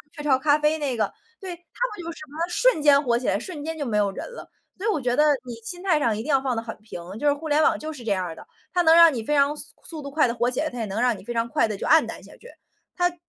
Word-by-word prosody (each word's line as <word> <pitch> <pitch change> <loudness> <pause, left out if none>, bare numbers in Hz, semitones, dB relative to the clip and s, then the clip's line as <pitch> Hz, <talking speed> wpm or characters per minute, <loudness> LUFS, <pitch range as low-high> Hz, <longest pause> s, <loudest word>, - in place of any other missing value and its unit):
雀 295 - -7
巢 270 -3 +3
咖 295 +1 +3
啡 300 +1 +2
那 275 -5 -2
个， - - 0 0.3
对， 370 -3 -6
她 345 - -25 0.3
不 350 - -8
就 335 - -5
是 - - -12
什 310 - -9
么 300 +3 -11
瞬 425 -2 +2
间 285 -1 +6
火 235 -2 +2
起 250 - -4
来， 195 - +1
瞬 310 -6 -7
间 325 0 -4
就 290 - -3
没 215 -3 -1
有 200 -1 +2
人 - - -6
了。 - - -10 0.3
所 410 +4 -3
以 - - +3
我 310 - 0
觉 245 -1 0
得 300 - +4 0.2
你 240 - -6
心 355 +10 -7
态 335 -6 +3
上 225 -6 +1
一 220 - -4
定 305 - -7
要 270 -1 +3
放 260 -3 -1
得 225 - -2
很 225 - -6
平， 215 -5 -9 0.2
就 295 - 0
是 285 - +5
互 315 +2 -7
联 300 +1 +3
网 - - +3
就 315 +1 -5
是 250 -5 -10
这 220 - -2
样 185 -2 0
儿 165 -2 -6
的， - - -13 0.3
它 355 - +3
能 325 0 +6
让 335 -3 +8
你 230 -3 -3
非 295 +5 0
常 285 +1 +3
速 295 - -9 0.2
速 315 -3 -8
度 280 - -7
快 295 -3 +3
地 235 - -1
火 240 +1 +1
起 - - -3
来， 310 0 0
它 245 -3 -8
也 225 - -1
能 205 +2 -4
让 245 -3 +3
你 - - -13
非 240 - -5
常 230 0 0
快 230 - +1
地 210 -2 -4
就 - - -5
黯 320 +1 +6
淡 - - -8
下 - - -14
去。 485 - -15 0.5
它 355 -1 +3
绝 - - -19
290 Hz, 370 characters per minute, -24 LUFS, 235-315 Hz, 0.5 s, 让